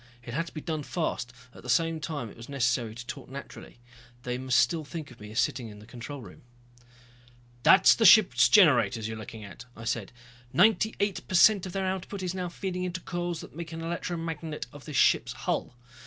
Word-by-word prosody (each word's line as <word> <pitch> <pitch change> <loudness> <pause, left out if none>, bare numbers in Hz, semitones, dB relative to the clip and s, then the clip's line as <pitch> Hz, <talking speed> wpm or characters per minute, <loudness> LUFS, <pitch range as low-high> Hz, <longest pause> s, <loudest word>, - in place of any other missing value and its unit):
It 120 - -8
had 165 +5 -1
to - - -9
be 155 - -5
done 155 -1 -3
fast, 145 -6 -3 0.2
at - - -13
the 125 - -10
same 165 +5 +2
time 145 -8 -5
it - - -15
was 115 +2 -11
necessary 120 -4 0
to 120 +1 -8
talk - - -8
naturally. 135 -2 -10 0.5
They 125 0 -3
must 130 -1 +1
still 165 -3 +2
think 155 0 -7
of - - -15
me 105 0 -10
as 110 - -2
sitting 120 -3 -1
in 105 - -11
the 105 - -13
control 125 +4 -8
room. - - -13 1.2
"That's 190 +9 +7
the 230 - 0
ship's 215 -3 +7
generators 130 - +5
you're 110 - -5
looking 110 0 -9
at," 100 +6 -11
I 115 - -9
said. 115 -3 -2 0.4
"Ninety 215 +6 +4
eight 200 -1 -1
per 185 - -3
cent 195 +1 +6
of 180 - -8
their 195 -1 -1
output 190 +1 -4
is 180 -1 -2
now 180 -1 -3
feeding 180 0 -4
into 180 0 -3
coils 175 -2 -3
that - - -12
make 170 0 -7
an 165 - -6
electromagnet 165 -2 -4
of 145 -1 -12
this 150 -4 -4
ship's - - +3
hull. - - -3
155 Hz, 215 wpm, -28 LUFS, 120-175 Hz, 1.2 s, That's